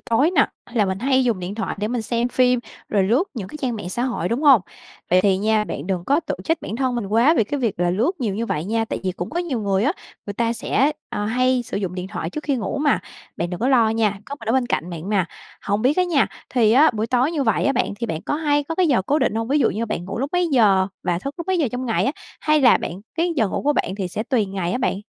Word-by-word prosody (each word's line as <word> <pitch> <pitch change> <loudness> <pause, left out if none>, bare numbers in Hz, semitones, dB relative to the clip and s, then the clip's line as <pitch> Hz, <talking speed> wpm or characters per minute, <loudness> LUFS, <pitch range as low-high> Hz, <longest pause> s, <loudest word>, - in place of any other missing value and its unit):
tối 270 +9 +2
nè, 290 -7 +4 0.2
hay 240 - -12
là 210 - +4
mình 190 0 -2
hay 260 +1 +2
dùng 230 -6 +1
điện 180 +3 -5
thoại 225 - -3
để 210 +1 -1
mình 240 -2 -2
xem 235 +2 -1
phim, 250 -1 +3 0.3
rồi 200 -2 +2
lướt 240 - +2
những 195 -5 -5
cái - - -8
trang 245 -4 -1
mạng 190 -4 -6
xã 240 +6 -2
hội, 240 -9 -1
đúng 240 +6 -1
hông? 270 -8 +7 0.5
Vậy 185 +1 +5
thì 195 -1 +3
nha, 215 +1 +2
bạn - - -6
đừng 180 -3 -2
có 290 +4 +2
tự 325 - -4
trách 325 -1 +1
bản 220 - -4
thân 260 -2 0
mình 235 -5 -2
quá 235 +10 +4
vì 220 - +3
cái 285 +5 -3
việc 220 -7 -1
là 175 0 +2
lướt 225 - +1
nhiều 210 -5 -1
như 230 +2 -2
vậy 150 -5 -2
nha, 225 +2 0
tại - - -4
vì 185 - 0
cũng 175 0 -6
có 340 - -2
nhiều 305 -10 -2
người 200 0 +1
á, 290 - +2 0.3
người 205 - -3
ta 230 +1 0
sẽ, 275 +5 +1 0.2
ờ, 205 - -2
hay 255 +3 +1
sử 230 - -5
dụng 190 -3 -3
điện 185 +1 -5
thoại 165 - -4
trước 305 - -6
khi 280 -3 +1
ngủ 245 +5 -3
mà, 290 -1 +2 0.4
bạn 170 +1 -2
đừng 180 - -5
có 250 - +1
lo 235 -5 +4
nha, 215 -3 +1
có 280 - -5
mình 225 - -7
ở 225 - +3
bên 260 -2 +2
cạnh 180 -6 -2
bạn 170 +3 -6
mà. 200 -4 +2 0.4
Hông 205 +2 -1
biết 275 +6 +3
á 365 - +3
nha, 330 -6 +2 0.2
thì 230 -4 +3
á 295 +6 +6
buổi 220 -1 -2
tối 255 +6 +1
như 295 - 0
vậy 225 -4 +1
á 275 - +3
bạn - - 0
thì 235 - -2
bạn 160 -5 -4
có - - -2
hay 290 -2 +1
có 325 - -4
cái 370 0 +2
giờ 240 -9 +3
cố 290 +10 +1
định 260 -5 +1
hông, 225 +1 -2
ví 290 +3 +3
dụ - - +3
như 230 +3 -2
bạn 175 -5 -3
ngủ 195 +4 -5
lúc 275 +3 -2
mấy 355 -1 +2
giờ 205 -9 +4 0.2
và 175 -1 0
thức 275 +8 -5
lúc 340 - -5
mấy 375 -2 +1
giờ 285 -7 +2
trong 250 +1 -3
ngày 225 - +1
á, 275 - +1 0.3
hay 305 -1 +3
là 250 -3 +6
bạn 180 +4 -6 0.2
cái 335 +1 +1
giờ 220 -6 +2
ngủ - - -3
của 295 - +3
bạn 195 - -1
thì 190 -3 -3
sẽ 210 - -3
tùy 225 -3 0
ngày 190 -2 -3
á - - -1
bạn? 190 -7 0
230 Hz, 305 wpm, -22 LUFS, 200-275 Hz, 0.5 s, hông